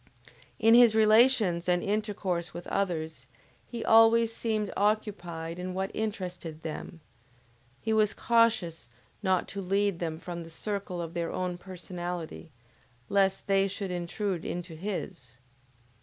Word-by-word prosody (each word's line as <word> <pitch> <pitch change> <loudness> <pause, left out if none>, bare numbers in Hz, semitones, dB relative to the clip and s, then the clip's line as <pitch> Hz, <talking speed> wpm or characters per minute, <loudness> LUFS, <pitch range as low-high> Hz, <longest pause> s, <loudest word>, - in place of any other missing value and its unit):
In 225 0 +5
his 235 -2 +7
relations 215 -5 +4
and 175 0 +2
intercourse 200 -4 -2
with 175 - -6
others, 160 -8 -2 0.4
he 235 -2 -5
always 225 0 +6
seemed 215 -3 -1
occupied 180 -6 -1
in 180 0 -4
what 190 +1 -2
interested 180 -7 -4
them; 165 +1 -6 0.8
he 220 - -1
was 215 -1 +3
cautions 220 - +2 0.3
not 190 -3 +1
to 200 - -4
lead 195 -1 +1
them 160 -2 -3
from 175 0 -6
the 165 - -9
circle 190 0 -4
of 165 0 -7
their 170 -1 -2
own 180 -1 -2
personality, 175 -3 -6 0.6
lest 195 -1 +2
they 195 0 +3
should 195 -1 -4
intrude 180 +1 -2
into 175 -1 -5
his. 165 - -6
185 Hz, 130 wpm, -29 LUFS, 170-210 Hz, 0.8 s, his